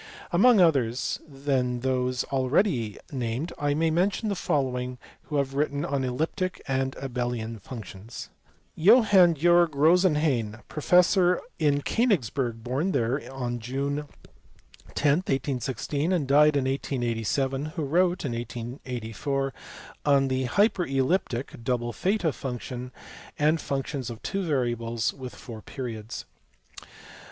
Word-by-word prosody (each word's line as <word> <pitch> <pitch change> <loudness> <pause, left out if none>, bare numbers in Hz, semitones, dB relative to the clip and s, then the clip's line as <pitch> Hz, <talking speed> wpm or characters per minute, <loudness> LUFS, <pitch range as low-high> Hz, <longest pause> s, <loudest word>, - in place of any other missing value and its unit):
Among 210 +5 +6
others 135 -9 +2
than 135 -4 -1
those 125 -1 0
already 130 - +1
named 130 +4 -3
I 145 0 +1
may 160 +1 +2
mention 195 +6 +1
the 200 - 0
following 125 -7 -1 0.3
who 150 - -5
have 140 -1 0
written 145 0 0
on 140 -1 -1
Elliptic 160 +8 -2
and 135 -1 -1
Abelian 120 -4 -3
functions. 110 -1 -9 0.4
Johann 195 -3 +6
Georg 170 0 +4
Rosenhain, 150 - +3
professor 180 +3 +3 0.2
in 145 -2 +2
Konigsberg, 135 - 0
born 140 +10 -1
there 125 +5 -1
on 120 -2 -3
June 140 +5 -3 0.9
10, 145 0 +3
1816, 135 - -2
and 165 -7 +1
died 150 +1 +5
in 135 - 0
1887, 135 +1 -1
who 155 +1 -4
wrote 175 +4 +1
(in 135 - -1
1844) 120 +2 -4 0.5
on 140 -2 +3
the 130 0 0
hyperelliptic 135 - 0
(double 120 -1 -1
theta) 185 -5 0
function 125 -1 -6 0.5
and 155 +2 +2
functions 135 -2 -3
of 115 -2 -7
two 195 - -2
variables 120 -7 -1
with 130 -2 -8
four 115 -4 -9
periods. 115 -4 -6
135 Hz, 115 wpm, -27 LUFS, 125-160 Hz, 0.9 s, Among